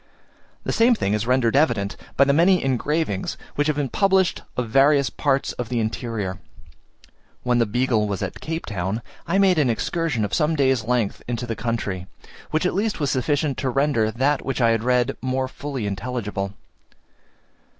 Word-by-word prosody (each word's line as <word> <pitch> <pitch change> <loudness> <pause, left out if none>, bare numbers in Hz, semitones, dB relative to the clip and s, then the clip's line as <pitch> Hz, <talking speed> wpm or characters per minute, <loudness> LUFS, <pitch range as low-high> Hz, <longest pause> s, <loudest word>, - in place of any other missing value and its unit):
The - - -2
same 235 +1 +4
thing 100 - -1
is 105 +2 -1
rendered 125 -2 +2
evident 115 -9 +2 0.2
by 140 - +7
the 140 0 +3
many 180 +4 +4
engravings 135 - -1 0.2
which 145 +1 0
have 155 - +1
been 145 -2 -1
published 190 +4 +2 0.2
of 125 -2 -1
various 135 +1 +4
parts 140 -2 0
of 120 -2 -5
the 120 -2 0
interior. 110 -4 -3 1.0
When 120 -1 +2
the 115 - +2
Beagle 115 -1 +1
was 100 -2 -3
at - - -5
Cape 160 +1 -4
Town, 100 +2 -3 0.2
I 175 - +1
made 190 -4 +4
an 140 -4 +3
excursion 130 -1 -1
of 100 - -6
some 155 +1 +2
days' 130 -5 +2
length 120 -4 0
into 120 0 -3
the 115 -1 -3
country, 100 -6 -3 0.4
which 155 +3 0
at - - +1
least 205 +2 -1
was 145 -3 0
sufficient 145 +2 0
to 135 - -1
render 135 -4 +2
that 135 +5 0
which 135 - -2
I 115 -2 +4
had 115 -1 0
read 125 -1 +1
more 130 0 -1
fully 135 -3 -5
intelligible. 100 -2 -3
125 Hz, 180 wpm, -23 LUFS, 115-145 Hz, 1.0 s, by